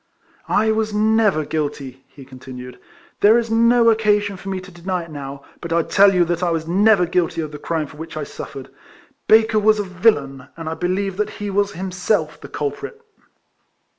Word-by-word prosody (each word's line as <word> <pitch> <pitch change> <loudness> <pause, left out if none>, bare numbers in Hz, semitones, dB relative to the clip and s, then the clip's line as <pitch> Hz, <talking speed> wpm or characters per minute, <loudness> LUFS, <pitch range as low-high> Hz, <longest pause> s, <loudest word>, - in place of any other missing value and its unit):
"I 220 +1 +2
was 220 0 0
never 215 -6 +2
guilty," 140 -4 -4
he 135 0 -14
continued. 125 -1 -10 0.2
" - - -30
There 215 +3 +6
is 230 -1 -1
no 230 +1 +5
occasion 210 -2 +1
for 195 +1 -8
me 190 -1 -2
to 185 +1 -13
deny 175 +1 -3
it 165 - -13
now; 140 -1 -8 0.2
but 170 - -7
I 170 0 +2
tell 200 +3 +5
you 175 -1 +4
that 175 +1 -2
I 180 - +1
was 165 -1 -2
never 195 +1 +4
guilty 175 -1 -1
of 155 -1 -5
the 150 - -8
crime 160 0 -2
for 150 - -14
which 160 0 -8
I 155 - -3
suffered. 135 -1 -9 0.6
Baker 220 0 +5
was 215 +1 +4
a 205 - -1
villain, 160 - 0
and 165 -1 -7
I 160 - -2
believe 185 +3 -2
that 210 - 0
he 205 -1 -4
was 200 +1 0
himself 180 -3 -2
the - - -10
culprit." 150 - -5
180 Hz, 195 wpm, -20 LUFS, 155-210 Hz, 0.6 s, There